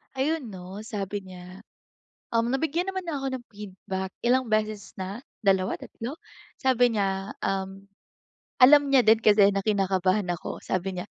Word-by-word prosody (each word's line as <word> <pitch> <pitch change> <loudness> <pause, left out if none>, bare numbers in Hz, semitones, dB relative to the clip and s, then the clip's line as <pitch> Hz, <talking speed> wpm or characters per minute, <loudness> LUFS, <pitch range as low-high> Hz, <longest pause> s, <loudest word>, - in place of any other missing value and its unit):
Ayun, 275 -3 -1
'no, 190 +3 -8
sabi 205 -2 -4
niya, 185 +1 -11 0.7
um, 230 +1 +2
nabigyan 320 +5 0
naman 375 -1 -4
na 320 - -2
ako 270 - -3
ng 240 - -16
feedback, 190 -2 -6
ilang 255 +1 +2
beses 215 -1 -1
na, 195 +7 -5 0.2
2, 190 -1 +2
3. 255 +8 -7 0.4
Sabi 250 -2 +3
niya, 195 -1 -1
um, 195 0 -3 0.7
alam 280 +2 +7
niya 265 -2 +6
din 220 0 +6
kasi 205 -2 +6
na 195 - 0
kinakabahan 195 -1 +1
ako, - - -6
sabi 185 0 -2
niya, 180 - -5
205 Hz, 150 wpm, -26 LUFS, 190-250 Hz, 0.7 s, alam